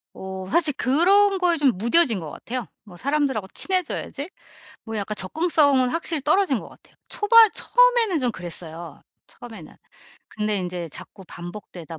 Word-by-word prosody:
어 190 0 -7
사실 315 -1 +2
그런 385 +9 +3
거에 350 -2 +2
좀 280 -4 +3
무뎌진 235 - +3
것 160 -3 -7
같아요. 245 +6 -6 0.2
뭐 200 -5 -15
'사람들하고 275 -6 -1
친해져야지.' 360 -4 -2 0.6
뭐 225 -1 -6
약간 210 +1 -3
접근성은 285 - +2
확실히 330 +1 -3
떨어진 310 - +2
것 - - -10
같아요. - - -21
초반 445 +1 +5
처음에는 480 -7 +2
좀 250 -4 0
그랬어요 170 -2 -7 0.3
처음에는. 220 -10 -12 0.5
근데 210 -1 -2
인제 180 -2 -5
자꾸 190 +5 -12
반복되다 175 -3 -10
255 Hz, 340 characters per minute, -23 LUFS, -, 0.6 s, 초반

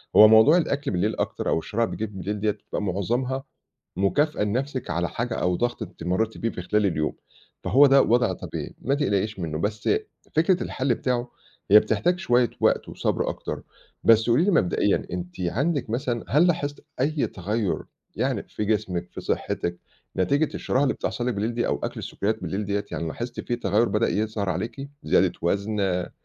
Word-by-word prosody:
هو 110 - +10
موضوع 110 +10 +7
الأكل 145 -4 -1
بالليل 100 +4 0
أكتر، - - -2
أو - - +2
الشراهة 115 +7 -1
اللي - - -5
بتيجي 110 -1 -4
لِك 95 - -10
بالليل 105 +3 -3
دِيّة، 105 +1 +2
بتبقى 105 - -6
معظمها 120 +8 -1 0.5
مكافأة 125 +7 +1
لنَفْسِك 130 +5 -2
على 85 0 -1
حاجة، 120 0 -3
أو 90 0 +1
ضغط 120 +3 -1
أنتِ - - -10
مرّيتِ 105 +6 0
بيه 115 - -1
في 90 - -6
خلال 105 +3 +1
اليوم، 75 -4 0 0.5
فهو 140 +3 +6
ده 135 0 +6
وضع 120 0 +3
طبيعي، - - -6
ما 135 +3 +1
تقلقيش 105 -7 0
منُّه، 80 -3 -3
بس 105 +4 -2 0.5
فكرة 175 +3 +3
الحلّ 130 -2 0
بتاعه، 125 0 -2 0.4
هي 105 - +10
بتحتاج 110 - 0
شوية 120 - +3
وقت، - - +2
وصبر - - -1
أكتر، - - -5 0.4
بس 115 +1 +5
قولي 130 +9 +4
لي 205 - +2
مبدئيًا، 95 - +2
أنتِ 90 0 -5
عندِك 135 - 0
مثلًا، 120 0 -2
هل 155 +6 +5
لاحظتِ 145 -5 -1 0.2
أي 150 +2 +1
تغيُّر 105 +2 -2 0.3
يعني - - -1
في 105 - -5
جسمِك، 90 -4 -1
في - - -7
صحتِك، 85 0 -2 0.4
نتيجة 140 - +1
الشراهة 130 - 0
اللي 140 - +2
بتحصل 120 - -3
لِك 125 - +1
بالليل 110 +3 -1
دي، 120 - 0
أو - - -1
أكل - - -3
السكّريّات 110 +3 -2
بالليل 100 +2 -2
دِيّة 100 0 -1
يعني، 85 - -3
لاحظتِ 120 +9 -5
في 120 - -2
تغيُّر 110 0 +2
بدأ 105 +3 +2
يظهر 105 -2 -1
عليكِ؟ 115 +9 -4
زيادة - - +3
وزن، 100 +4 0
آآ 90 -2 0
110 Hz, 185 wpm, -25 LUFS, 100-130 Hz, 0.5 s, هو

